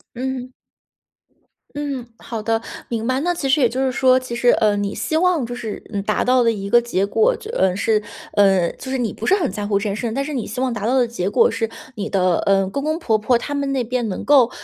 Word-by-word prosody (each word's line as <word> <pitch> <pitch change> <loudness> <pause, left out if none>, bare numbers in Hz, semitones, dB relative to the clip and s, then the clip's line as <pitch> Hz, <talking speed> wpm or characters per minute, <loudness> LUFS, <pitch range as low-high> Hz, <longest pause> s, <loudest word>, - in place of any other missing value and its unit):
嗯。 255 0 -4 1.2
嗯， 280 -4 -3
好 225 -2 -6
的， 225 +1 0 0.3
明 230 -1 -3
白。 255 +1 +1
那 350 +4 0
其 310 -6 -2
实 280 +2 +3
也 245 - +4
就 265 +2 -1
是 260 - +1
说， 255 +1 +4
其 255 -2 -6
实， 240 +1 +2
呃， 210 -3 +3
你 205 -1 -2
希 315 - -1
望 345 -7 +2
就 240 - -6
是， 225 -3 -6
嗯， 200 - -1
达 215 +1 0
到 255 0 +3
的 230 -1 +3
一 200 -2 -5
个 240 +3 +5
结 200 -5 0
果， 450 - +2
就 445 - -8
嗯， 190 - +1
是， 215 0 +2 0.3
呃， 190 -4 +4
就 260 - -10
是 265 - -1
你 235 -4 -1
不 - - -11
是 390 - +5
很 335 -10 -1
在 205 -1 -4
乎 200 -1 +2
这 200 - -2
件 205 -1 -1
事 - - -5
情， 235 -2 -2
但 275 0 -1
是 300 - -5
你 245 -5 -3
希 220 - -5
望 255 -2 0
达 210 0 -3
到 260 +2 +2
的 245 -2 +3
结 200 -5 -2
果 - - +4
是 225 0 -2 0.2
你 210 -3 -4
的 185 -3 +2
嗯， 195 -1 +2
公 280 - -3
公 310 +1 0
婆 220 -10 +1
婆 235 +3 +2
他 290 +4 -5
们 280 -1 -1
那 260 -3 0
边 240 0 -2
能 185 - -5
够， 265 -5 +5
240 Hz, 285 characters per minute, -20 LUFS, 210-265 Hz, 1.2 s, 个